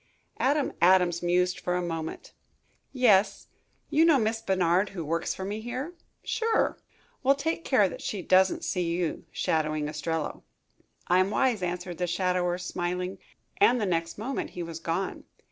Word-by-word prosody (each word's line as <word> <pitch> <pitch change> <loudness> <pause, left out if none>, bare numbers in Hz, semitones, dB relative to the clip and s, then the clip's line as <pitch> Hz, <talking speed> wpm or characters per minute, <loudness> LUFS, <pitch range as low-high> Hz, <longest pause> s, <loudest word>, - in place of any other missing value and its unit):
Adam 285 +2 +1
Adams 175 -1 +4
mused 180 +1 +1
for 180 - -1
a - - +1
moment. 165 -2 -5 0.6
"Yes. 210 -6 +3 0.4
You 315 - +4
know 325 -3 +6
Miss 225 -1 0
Bernard, 190 -1 +2
who 165 - -3
works 165 +2 -1
for 190 - -5
me 210 +2 -4
here?" 255 +8 -5 0.3
"Sure." 450 0 0 0.4
"Well, 275 +1 +4
take 320 +4 -2
care 210 -8 +4
that - - -8
she 195 -4 -4
doesn't 185 +1 +3
see 170 -2 -1
you 175 -3 -3
shadowing 155 -1 0
Ostrello." 155 +1 -3 0.6
"I'm 185 +2 +3
wise," 240 -1 +1
answered 180 0 -4
the 180 - 0
shadower, 180 0 0
smiling, 180 +1 -3 0.4
and 250 -12 +5
the 210 - 0
next 165 -2 -1
moment 250 +6 -3
he 175 - -2
was 165 -1 -6
gone. 170 +3 -3
180 Hz, 155 wpm, -28 LUFS, 175-220 Hz, 0.6 s, know